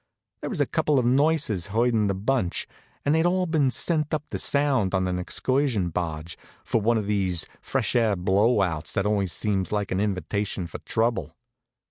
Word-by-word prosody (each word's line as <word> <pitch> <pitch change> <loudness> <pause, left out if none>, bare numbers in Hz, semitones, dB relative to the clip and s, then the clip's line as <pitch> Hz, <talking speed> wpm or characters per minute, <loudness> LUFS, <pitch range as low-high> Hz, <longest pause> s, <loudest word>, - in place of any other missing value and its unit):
There - - -4
was - - -4
a - - +3
couple 150 -2 +1
of 125 - +2
nurses 135 - +2
herdin' 115 0 +1
the 100 - 0
bunch, 100 -2 -1 0.4
and 145 - +3
they'd 160 0 +3
all 185 +1 +1
been 155 -5 +2
sent 155 +3 +1
up 155 - -4
the - - -2
Sound 135 -9 +2
on 95 0 +1
an 90 0 -2
excursion 125 -1 0
barge, 80 -1 -4 0.3
for 115 - 0
one 115 +2 +2
of 105 - -2
these 95 -5 +1 0.2
fresh - - -1
air 115 -4 +3
blow 100 +4 +2
outs 80 -4 -2
that 100 -2 0
always 100 -3 +1
seem 95 +4 0
like 105 -2 -2
an 95 - 0
invitation 100 -1 -2
for 85 - -8
trouble. 110 - -1
105 Hz, 185 wpm, -25 LUFS, 95-130 Hz, 0.4 s, a